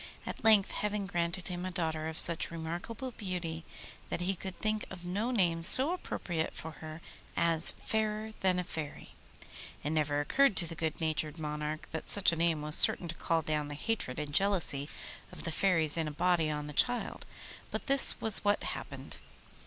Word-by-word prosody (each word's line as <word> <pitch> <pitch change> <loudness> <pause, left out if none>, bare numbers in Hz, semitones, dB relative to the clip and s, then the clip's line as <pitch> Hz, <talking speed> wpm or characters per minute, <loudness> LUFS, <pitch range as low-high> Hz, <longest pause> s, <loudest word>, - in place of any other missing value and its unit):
At - - -7
length 215 -3 +5
heaven 210 -1 -3
granted 175 -1 -3
him 180 0 -5
a 185 - -3
daughter 160 -4 -3
of 160 0 -5
such 165 -3 +4
remarkable 175 +10 -6
beauty 180 -7 -5 0.5
that - - -3
he 185 +2 0
could 190 0 -7
think 215 0 -1
of 180 -2 -10
no 200 +7 -2
name 175 -9 +1
so 260 - +5
appropriate 175 - -4
for 160 - -7
her 155 +1 -9 0.4
as 165 -1 +4
'Fairer 220 0 -2
than 185 -1 +1
a 180 - -1
Fairy.' 160 -4 -7 0.7
It 145 - -2
never 150 -2 0
occurred 235 - +2
to 175 - +3
the 165 - -6
good 160 -1 -3
natured 155 -1 -2
monarch 150 0 -5
that 160 - -6
such 200 -3 +5
a - - -2
name 165 -2 0
was 150 0 +6
certain 175 - +5
to - - -2
call 165 -1 -1
down 150 -1 -2
the 145 - -6
hatred 150 - -3
and 150 -1 -5
jealousy 170 -7 +2 0.4
of - - -10
the 165 - -3
fairies 165 -3 +5
in 160 - -1
a - - -4
body 170 0 +1
on 150 -1 -4
the 150 - -8
child, 245 - 0 0.4
but - - -5
this 275 -1 +6
was 220 -3 +2
what 205 0 +1
happened. - - -7
170 Hz, 190 wpm, -31 LUFS, 155-195 Hz, 0.7 s, was